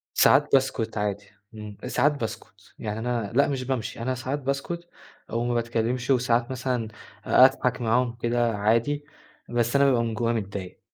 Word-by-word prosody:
ساعات 145 +2 +5
باسكت 120 -5 +1
عادي، 105 0 -2 0.3
امم، 105 -1 -8
ساعات 150 +1 +2
باسكت. 110 - -7
يعني 105 0 -4
أنا 115 -3 -2
لأ 140 +2 +4
مش 130 -2 -2
بامشي، 125 -4 -3
أنا 130 +1 -1
ساعات 130 +3 -3
باسكت 140 +6 -3 0.4
أو 115 +1 -1
ما 120 0 0
باتكلمش، 120 +2 -1
وساعات 120 -2 +2
مثلًا 125 -3 -2 0.4
أ 130 - +7
أضحك 130 -1 +2
معاهم 120 +1 +1
كده 120 -1 0
عادي، 115 +8 +1 0.4
بس 120 +2 +1
أنا 140 - +5
بابقى 125 -4 +3
من 115 -1 -2
جوايا 115 +1 0
متضايق 100 -3 -5
120 Hz, 165 wpm, -25 LUFS, 115-130 Hz, 0.4 s, أ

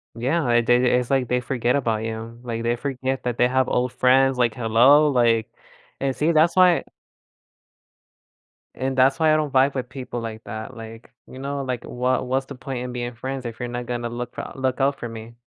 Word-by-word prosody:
Yeah, 130 +3 0
they 120 +1 +3
they 125 0 +3
it's 125 - -5
like 135 -2 +2
they 125 +2 +1
forget 125 -1 0
about 115 -5 0
you. 115 +1 -6
Like, 115 -1 -4
they 120 +1 +1
forget 130 0 -3
that 120 -1 -2
they 125 - +4
have 130 0 +1
old 125 0 0
friends 130 +1 +3
like, 120 -3 +1
"Hello?" 125 +6 +5
Like 115 -3 +2 0.5
and 135 -1 -1
see 155 +3 +1
that's 165 +2 +3
why 180 -2 +5 1.9
and 130 0 -3
that's 135 +5 +4
why 155 -1 +4
I - - +4
don't 150 -3 -1
vibe 135 +1 +3
with 130 -2 -3
people 125 -2 -6
like 110 -1 -7
that. 110 0 -7
Like, 115 0 -11 0.2
you 130 - -11
know, 140 +1 -3
like, 125 -2 -4
what 125 +1 -1
what's 130 +1 -1
the 140 - -9
point 130 0 -5
in 125 0 -5
being 120 -1 -4
friends 130 +1 -5
if 115 -2 -6
you're 125 - -3
not 120 0 -5
gonna 120 -1 -3
look 120 +1 -6
f - - -6
look 130 0 -1
out 140 +1 +1
for 120 - -5
me? 115 +1 -9
125 Hz, 215 wpm, -23 LUFS, 120-135 Hz, 1.9 s, Hello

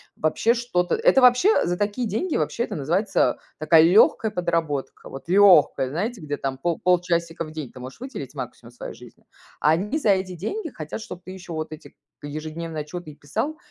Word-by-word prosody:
Вообще 185 +9 +2
что-то 230 -8 -1
это 450 - +4
вообще 250 - +5
за 175 0 -1
такие 205 +3 -1
деньги, 295 - -2
вообще 235 - -1
это 210 - -5
называется 175 +8 +1 0.2
такая 160 +1 +5
легкая 210 +5 +5
подработка. 165 -6 -2
Вот 135 +4 -10
легкая, 180 -9 +5
знаете, 200 - -3
где 145 -1 -4
там 135 -1 -4
пол 170 +2 -1
полчасика 170 -2 +1
в 155 - -9
день 155 -6 -6
ты 125 - -12
можешь 130 - -9
выделить 205 - -7
максимум 125 -2 -8
своей 120 - -8
жизни. - - -16 0.3
А 150 - +3
они 200 - 0
за 255 -9 0
эти 190 -2 +1
деньги 320 - -4
хотят, 155 +4 -6
чтоб 180 -5 -9
ты 185 - -9
еще 185 -2 -9
вот 155 0 -4
эти 155 0 -11 0.2
к 145 - -8
ежедневные 155 +1 -5
отчеты 155 +1 -8
и - - -15
писал, 275 - -3
175 Hz, 195 wpm, -24 LUFS, 155-210 Hz, 0.3 s, вообще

